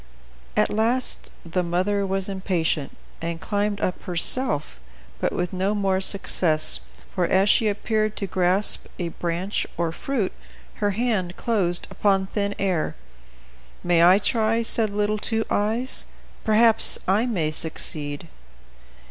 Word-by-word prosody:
At - - +3
last 235 +4 0 0.2
the 175 +2 -1
mother 185 +3 0
was 195 0 0
impatient, 180 -7 -2 0.2
and 165 0 -3
climbed 205 +1 -1
up 185 - -2
herself, 175 - 0 0.4
but - - 0
with 180 0 -3
no 190 +3 0
more 195 -2 +1
success, 175 -5 +3 0.3
for, 180 -2 +1
as 190 +2 +3
she 220 - +4
appeared 215 +1 -1
to 200 - -2
grasp 185 +2 +1
a 175 -1 -3
branch, 175 +4 -3
or 170 -1 0
fruit, 225 +2 -2 0.5
her 205 -1 -1
hand 210 -7 -1
closed 190 -7 0
upon 195 -2 +1
thin 200 +1 -2
air. 185 -5 -1 0.9
"May 175 -1 +3
I 180 +2 +7
try?" 225 +2 +1
said 225 -1 +2
little 210 +1 -1
Two 225 +1 0
Eyes; 225 +5 -1 0.4
"perhaps 225 +1 +5
I 210 +6 +2
may 170 -10 -1
succeed." 150 -1 -1
195 Hz, 130 wpm, -24 LUFS, 175-215 Hz, 0.9 s, I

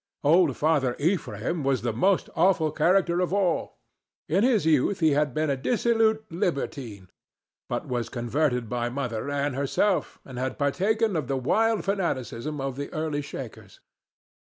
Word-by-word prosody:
Old 155 -2 +4
Father 145 -5 +1
Ephraim 170 0 -1
was 135 -4 0
the 120 -2 -1
most 185 - +2
awful 165 -3 +3
character 175 +1 +2
of 180 -1 0
all. 190 -4 0 0.5
In 190 +6 +2
his 235 -7 +3
youth 160 +5 +2
he 160 -3 +4
had 145 0 +1
been 155 +3 0
a - - +1
dissolute 220 - +1
libertine, 140 - -3 0.6
but - - -3
was 120 -2 -2
converted 125 0 -1
by 120 +1 -2
Mother 125 -1 -3
Ann 145 0 -1
herself, 140 +9 0
and 130 -2 -8
had 130 +1 -3
partaken 200 +9 +1
of 155 -6 -1
the 135 - -1
wild 220 - +1
fanaticism 155 - -2
of 135 -1 -3
the 145 - -5
early 155 -2 -2
Shakers. 115 -8 -9
150 Hz, 155 wpm, -26 LUFS, 130-185 Hz, 0.6 s, Old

